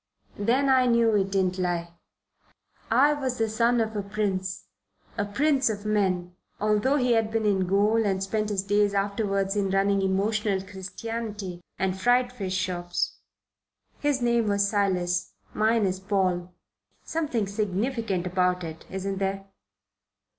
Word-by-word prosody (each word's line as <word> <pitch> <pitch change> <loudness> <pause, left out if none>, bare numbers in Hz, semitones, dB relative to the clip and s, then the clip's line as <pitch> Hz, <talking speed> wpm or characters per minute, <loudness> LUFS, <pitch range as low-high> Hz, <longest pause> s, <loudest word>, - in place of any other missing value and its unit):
Then 250 +7 +2
I 260 -1 +4
knew 235 -2 +3
it 195 -1 +1
didn't 190 -1 0
lie. 170 -1 -2 1.0
I 275 +6 +5
was 265 -4 -2
the 225 - +1
son 230 +2 +2
of 220 -1 -1
a 205 - 0
prince, 195 -2 -2 0.5
a 205 - -1
prince 270 +5 +2
of 205 -1 -4
men, 185 -4 0 0.2
although 215 +6 +2
he 250 -3 +2
had 225 -2 +2
been 220 -1 -1
in 190 -3 +2
gaol 210 +4 +3
and 195 -2 0
spent 215 +2 -1
his 195 -2 -1
days 205 0 +2
afterwards 200 -1 0
in 200 -2 0
running 195 +1 +2
emotional 200 +1 +1
Christianity 200 -1 -6 0.2
and 190 0 -1
fried 245 0 +3
fish 195 -6 -3
shops. 175 -2 -2 0.8
His 285 -4 0
name 235 -2 +2
was 200 0 +2
Silas. 180 -4 0 0.2
Mine 220 0 +2
is 185 0 -1
Paul. 185 -3 0 0.5
Something 300 -10 -1
significant 205 0 -1
about 180 0 +1
it, 160 -1 -8
isn't 190 0 -3
there? 195 0 -2
200 Hz, 145 wpm, -26 LUFS, 190-225 Hz, 1.0 s, I